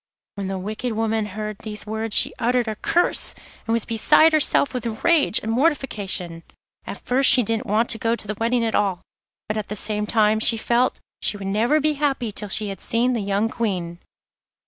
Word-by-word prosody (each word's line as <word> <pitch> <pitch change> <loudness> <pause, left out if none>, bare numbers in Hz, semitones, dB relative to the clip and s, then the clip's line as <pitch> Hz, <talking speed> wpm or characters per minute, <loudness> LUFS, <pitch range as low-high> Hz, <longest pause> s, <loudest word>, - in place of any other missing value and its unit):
When 200 -2 -5
the 190 0 -3
wicked 215 +5 -4
woman 220 -1 -1
heard 210 +1 -6
these 215 -1 -6
words 220 0 -3
she - - +4
uttered 245 0 +1
a 215 - -3
curse, 345 +10 +1 0.3
and 225 - 0
was 230 -2 0
beside 300 +8 +4
herself 295 -2 +3
with 230 -3 -5
rage 335 -9 +4
and 220 - -2
mortification. 215 - -1 0.5
At - - -8
first 260 +2 +4
she 250 - +5
didn't 225 +3 -2
want 220 +3 +1
to 225 - -2
go 230 0 +1
to 215 - -10
the 210 - -2
wedding 230 +1 +1
at 225 - -2
all, 195 -4 0 0.5
but 215 - -2
at 215 - -4
the 210 - -5
same 210 +1 -2
time 215 -1 +2
she 225 +1 +2
felt 240 +3 +1 0.2
she 205 - -1
would 200 - -8
never 225 +10 +2
be 305 +1 +1
happy 270 -6 0
till 205 0 -3
she 210 +1 0
had 195 -2 -7
seen 240 +2 0
the 230 - -1
young 200 +2 0
Queen. 180 -7 -3
220 Hz, 205 wpm, -22 LUFS, 210-240 Hz, 0.5 s, she